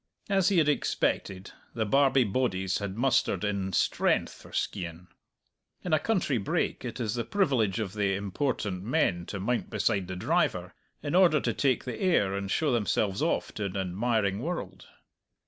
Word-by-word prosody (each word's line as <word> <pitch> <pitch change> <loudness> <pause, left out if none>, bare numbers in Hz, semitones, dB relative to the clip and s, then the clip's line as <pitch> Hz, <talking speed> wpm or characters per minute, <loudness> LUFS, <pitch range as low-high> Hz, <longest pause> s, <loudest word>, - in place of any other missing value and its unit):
As 195 -1 +3
he 195 - +2
had 155 -3 +4
expected, 95 -8 -1 0.2
the 110 -2 0
Barbie 135 +3 +4
bodies 95 -5 0
had 100 -1 -5
mustered 130 -2 +1
in 100 -2 -1
strength 85 - +1
for - - -15
Skeighan. 85 0 -4 0.7
In 175 - -2
a 155 - +5
country 170 - 0
brake 100 - -1
it - - -5
is 110 -4 -1
the 120 - -1
privilege 125 - +1
of 100 -4 -3
the 100 -2 0
important 100 -1 -2
men 100 - 0
to 100 - -5
mount 120 +5 -1
beside 100 -5 0
the 95 - -5
driver, 90 - 0 0.3
in 145 - -3
order 175 -4 +5
to - - 0
take 130 -4 +1
the 125 -3 -6
air 160 - +2
and 100 0 -3
show 150 +7 +1
themselves 105 -3 0
off - - 0
to 105 - -3
an 100 0 -4
admiring 100 +2 0
world. 100 - -5
110 Hz, 170 wpm, -28 LUFS, 95-135 Hz, 0.7 s, a